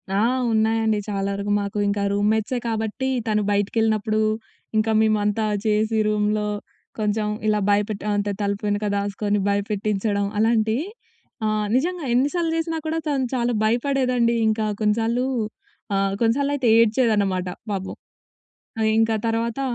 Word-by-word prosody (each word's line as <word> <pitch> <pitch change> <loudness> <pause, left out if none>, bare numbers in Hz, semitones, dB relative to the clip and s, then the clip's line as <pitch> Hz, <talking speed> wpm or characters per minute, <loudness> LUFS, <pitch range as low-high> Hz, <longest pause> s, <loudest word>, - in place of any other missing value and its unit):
ఆ! - - +2 0.3
ఉన్నాయండి 220 -1 +2
చాలా 200 -1 -2
వరకు 200 +1 -3
మాకు, 200 +1 -4
ఇంకా 200 0 0
రూమ్‌మేట్సే 215 +4 +1
కాబట్టి 225 +4 -2 0.2
తను 210 -1 +2
బయటికెళ్ళినప్పుడు, 215 +1 +1 0.6
ఇంక 215 +1 +2
మేమంతా 215 0 +2 0.2
చేసి 215 +1 +1
రూమ్‌లో 210 0 +1 0.5
కొంచెం 210 0 0 0.2
ఇలా 210 0 +2
భయపెట్టి, 205 0 0
అంతే 205 0 0
తలుపు 200 0 -2
వెనక 205 +1 0
దాసుకొని 205 +1 -1
భయపెట్టించడం 205 0 0
అలాంటియి, 225 +5 +2 0.6
ఆహ్, 215 0 0
నిజంగా 345 +3 0
ఎన్నిసార్లు 320 +6 +1
జేసినా 325 0 -1
కూడా 325 +1 -1
తను 270 -3 +1
చాలా 240 0 +1
భయపడేదండి. 245 0 +1
ఇంకా 220 0 +1 0.2
కొన్నిసార్లు 225 +4 +1 0.7
ఆహ్, 195 0 +1
కొన్నిసార్లయితే 270 +2 +2
ఏడ్చేదనమాట, 210 -5 +2 0.2
పాపం. 190 -1 -4 0.9
ఆహ్, 220 0 +3
ఇంక 225 0 +3 0.2
తర్వాత 230 +3 -1
215 Hz, 120 wpm, -23 LUFS, 205-235 Hz, 0.9 s, ఆహ్